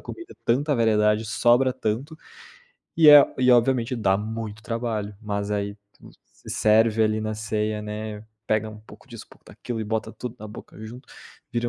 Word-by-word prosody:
comida, 345 - -10
tanta 145 +5 +1
variedade, 110 -1 +2
sobra 120 +4 +2
tanto. 130 +6 -4 0.8
E 160 -2 +6
é 145 -1 +11 0.2
e 125 0 +4
obviamente 125 0 +2
dá 95 -3 +2
muito 110 0 -6
trabalho. 110 -3 -4
Mas 100 -1 -4
aí, 100 0 -2 0.2
todo - - -23
mundo - - -16 0.2
se - - -13
serve 110 +1 +3
ali, 110 0 +1
na 110 0 -3
ceia, 105 0 -3
né, 105 0 -6 0.2
pega 110 0 0
um 110 - -11
pouco 110 - -17
disso, - - -10
um - - -40
pouco - - -20
daquilo 115 -2 -7
e - - -3
bota 110 +1 -3
tudo 125 -1 -7
na 110 - -8
boca 105 - -12
junto, 125 +5 -11 0.4
vira 120 0 -1
110 Hz, 185 wpm, -24 LUFS, 105-120 Hz, 0.8 s, é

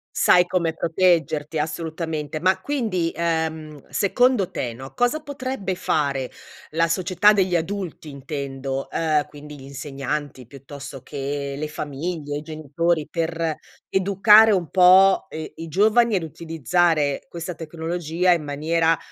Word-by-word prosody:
Sai 180 - +5
come 170 -3 0
proteggerti, 165 -3 +1
assolutamente. 160 -1 -4
Ma, 185 +2 +2
quindi, 205 -10 -1
ehm, 160 -3 -2
secondo 200 - +2
te, 120 -2 -4
no, 130 +3 -10
cosa 245 +5 +1
potrebbe 260 -10 -4
fare 140 -7 -1 0.4
la 165 +2 +1
società 185 +4 +3
degli 190 -3 +1
adulti, 175 -1 -3
intendo, 135 -1 -5
uhm, 155 -2 +1
quindi 150 0 -11
gli 135 - -13
insegnanti, 140 -1 -5
piuttosto 140 0 -10
che 140 0 -4
le 155 +1 -4
famiglie, 150 0 -4
i - - -7
genitori, 155 +1 -1
per 165 -1 -2 0.3
educare 200 +3 +6
un 185 -6 +1
po', 190 +1 +6
uhm, 155 0 -5
i 165 0 -8
giovani 215 +5 +3
ad 175 - -2
utilizzare 160 -1 0
questa 170 +1 -6
tecnologia 165 +2 -1
in 170 -3 +1
maniera 160 +3 +1
165 Hz, 130 wpm, -23 LUFS, 145-180 Hz, 0.4 s, educare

